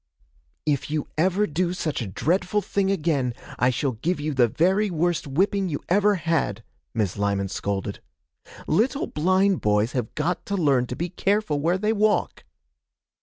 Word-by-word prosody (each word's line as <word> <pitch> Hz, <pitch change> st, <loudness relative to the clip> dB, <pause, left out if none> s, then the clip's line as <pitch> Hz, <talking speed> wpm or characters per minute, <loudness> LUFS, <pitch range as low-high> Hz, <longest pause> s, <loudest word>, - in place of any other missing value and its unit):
'If 145 Hz, -3 st, 0 dB
you 150 Hz, -1 st, -2 dB
ever 185 Hz, +6 st, +2 dB
do 175 Hz, +1 st, -1 dB
such 155 Hz, -7 st, -2 dB
a 115 Hz, -, -3 dB
dreadful 180 Hz, -, 0 dB
thing 195 Hz, -1 st, 0 dB
again, 150 Hz, -10 st, 0 dB, 0.2 s
I 125 Hz, -, +4 dB
shall 130 Hz, +2 st, 0 dB
give 145 Hz, +9 st, -2 dB
you 150 Hz, +1 st, -2 dB
the 125 Hz, -3 st, +4 dB
very 190 Hz, -, +2 dB
worst 175 Hz, -2 st, 0 dB
whipping 190 Hz, +6 st, +1 dB
you 145 Hz, -, -2 dB
ever 205 Hz, +3 st, +4 dB
had,' 160 Hz, -, -1 dB, 0.3 s
Miss 105 Hz, -5 st, -1 dB
Lyman 100 Hz, -1 st, 0 dB
scolded. 100 Hz, 0 st, -3 dB, 0.6 s
'Little 240 Hz, -, +1 dB
blind 185 Hz, +4 st, +2 dB
boys 105 Hz, +2 st, +2 dB
have 125 Hz, -4 st, -3 dB
got 170 Hz, +4 st, -1 dB
to 200 Hz, -, -1 dB
learn 140 Hz, -7 st, +2 dB
to 125 Hz, -, -5 dB
be 175 Hz, +5 st, -3 dB
careful 195 Hz, -4 st, 0 dB
where 170 Hz, +5 st, +1 dB
they 215 Hz, +3 st, +1 dB
walk.' 215 Hz, 0 st, +1 dB
165 Hz, 165 wpm, -24 LUFS, 130-190 Hz, 0.6 s, I